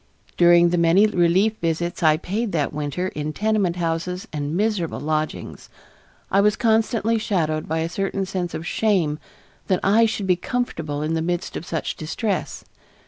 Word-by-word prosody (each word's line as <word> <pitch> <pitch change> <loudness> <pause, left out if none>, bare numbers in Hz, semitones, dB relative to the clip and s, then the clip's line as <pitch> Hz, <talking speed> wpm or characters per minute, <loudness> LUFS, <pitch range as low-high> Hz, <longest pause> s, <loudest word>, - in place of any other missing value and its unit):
During 175 0 +6
the 175 0 +1
many 170 +5 +5
relief 190 +2 +2
visits 170 +1 -2
I 155 -2 +4
paid 205 +6 -3
that 150 -4 0
winter 150 +5 -2
in 150 -1 -4
tenement 210 -4 +1
houses 175 +1 -2
and 150 +2 -2
miserable 205 -5 -1
lodgings, 155 +1 -3 0.6
I 195 - +4
was 210 +1 +3
constantly 225 0 +1
shadowed 160 -8 -1
by 160 +1 -1
a 165 - -1
certain 195 +2 -2
sense 185 -2 -3
of 160 - -5
shame 175 -8 +1 0.5
that 185 - +2
I 220 +4 +4
should 215 -2 -3
be 185 -1 +3
comfortable 165 - -3
in 155 +1 -1
the 165 - 0
midst 175 +2 -2
of 170 - -6
such 165 - -3
distress. 195 +7 -3
175 Hz, 165 wpm, -22 LUFS, 160-205 Hz, 0.6 s, During